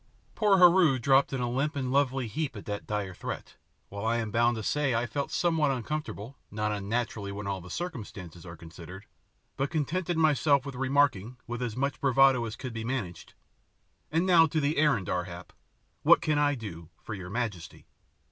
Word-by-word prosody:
Poor 210 -3 +3
Heru 175 -6 +6
dropped 135 +3 +3
in 135 -2 -2
a 120 - 0
limp 140 +6 -1
and 130 -3 -2
lovely 135 -2 +1
heap 140 +3 -3
at 105 - -9
that 105 -1 -5
dire 105 -3 -3
threat, - - -7 0.3
while 100 +1 -6
I 115 +1 +1
am 110 -2 -3
bound 120 +2 +3
to 110 - -4
say 140 0 +1
I 115 +1 +1
felt 140 +5 -3
somewhat 160 -4 +1
uncomfortable, 135 -2 -4
not 105 0 -2
unnaturally 105 0 -2
when 100 +1 -6
all 100 -1 -3
the 90 - -11
circumstances 100 - -6
are 85 -2 -10
considered, 85 +4 -11 0.5
but 135 +1 0
contented 170 +2 -1
myself 145 -3 +3
with 140 - -5
remarking, 130 -4 +1
with 120 0 -5
as 120 -3 -3
much 140 0 -1
bravado 135 -2 +4
as 110 -1 -5
could 130 -1 -7
be 115 -1 -4
managed, 110 -9 -5 0.8
"And 165 +3 +2
now 170 -3 +6
to 155 +1 -1
the 145 +1 0
errand, 145 - +2
Ar 90 -1 -1
hap. 85 0 -10 0.5
What - - +6
can 155 -3 +1
I 145 -1 +2
do 85 - -8
for 105 - -8
your 90 -3 -7
majesty?" 105 -6 -4
125 Hz, 190 wpm, -28 LUFS, 105-145 Hz, 0.8 s, Heru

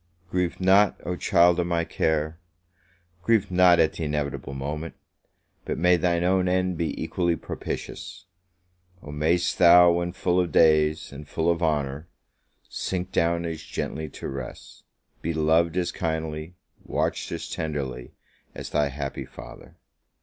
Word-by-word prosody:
Grieve 90 -2 -1
not, 95 +2 +4
oh 90 - -2
child 85 0 +4
of 85 - 0
my 85 -1 0
care! 80 0 -1 0.8
Grieve 105 -1 +2
not 90 -1 +5
at 80 -1 +3
the 85 - -5
inevitable 70 -3 -3
moment! 75 +4 -5 0.7
but - - -3
may 90 +1 +4
thy 85 0 +1
own 90 +1 +2
end 90 0 +1
be 80 -1 -3
equally 85 -2 0
propitious! 95 +3 -7 0.8
Oh, 75 - -8
may'st 80 +4 0
thou, 90 0 +8
when 85 0 -1
full 90 0 0
of 90 -3 0
days, 75 0 +3
and 70 +1 -10
full 80 +2 +1
of 85 0 -2
honour, 75 -1 -1 0.6
sink 95 0 -4
down 85 0 +1
as 80 -1 -4
gently 80 -1 -5
to - - -7
rest! 65 -2 -8 0.4
be 85 - -2
loved 80 +2 +2
as 90 -1 0
kindly, 80 -1 -4 0.3
watched - - -2
as - - -5
tenderly, 70 -6 -4 0.4
as - - -7
thy 75 - +2
happy 70 0 -5
father! - - -12
85 Hz, 145 wpm, -25 LUFS, 75-90 Hz, 0.8 s, thou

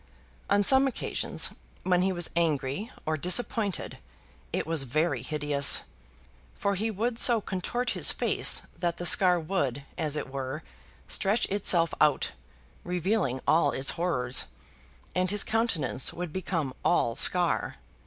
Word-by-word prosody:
On 205 0 +3
some 265 +5 +6
occasions, 265 - -2 0.3
when 180 -1 +2
he 190 +1 +1
was 175 -2 -1
angry 160 - -1 0.2
or 155 0 -1
disappointed, 205 - -1 0.5
it - - -2
was 160 -1 +1
very 155 +6 0
hideous; 145 -2 +3 0.7
for 200 - -1
he 215 +4 -2
would 230 +3 -3
so 235 -2 +5
contort 215 +6 -3
his - - +2
face - - 0 0.2
that 170 -1 -2
the 175 - -6
scar 180 -1 +5
would, 145 -6 -2 0.2
as 155 -3 -1
it 150 - -4
were, 135 +3 -5 0.4
stretch 205 +4 0
itself 180 -4 +3
out, 150 -2 +2 0.5
revealing 180 - -1
all 155 -3 +3
its 135 +1 +2
horrors, 130 -8 0 0.7
and 185 0 0
his 205 +1 +1
countenance 200 - 0
would 175 -2 -7
become 165 -7 -3
all 115 - +1
scar. 175 +6 +1
175 Hz, 135 wpm, -27 LUFS, 150-200 Hz, 0.7 s, some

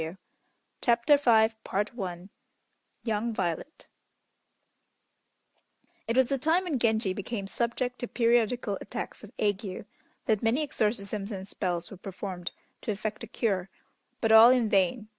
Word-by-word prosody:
] - - -46
CHAPTER 235 +3 +4
V 230 -6 +5 1.5
YOUNG 225 0 -1
VIOLET 180 - -3 2.2
It 230 +2 0
was 260 - +6
the 275 +2 -1
time 325 +7 +2
when 315 -8 -1
Genji 220 -4 +2
became 200 +1 -4
subject 245 +4 -2
to 245 - -3
periodical 235 -3 +1
attacks - - -6
of 215 - -11
ague, 205 -2 -2 0.4
that 215 -2 +2
many 235 +7 +2
exorcisms 210 -5 -1
and 190 -1 -6
spells 175 -4 -3
were 195 - -9
performed 185 -1 -6 0.3
to - - -2
effect 215 +1 -4
a - - -6
cure, 195 -5 -1 0.5
but 225 - +2
all 220 +2 +10
in 250 -3 +3
vain. 205 +3 +2
220 Hz, 130 wpm, -28 LUFS, 195-240 Hz, 2.2 s, all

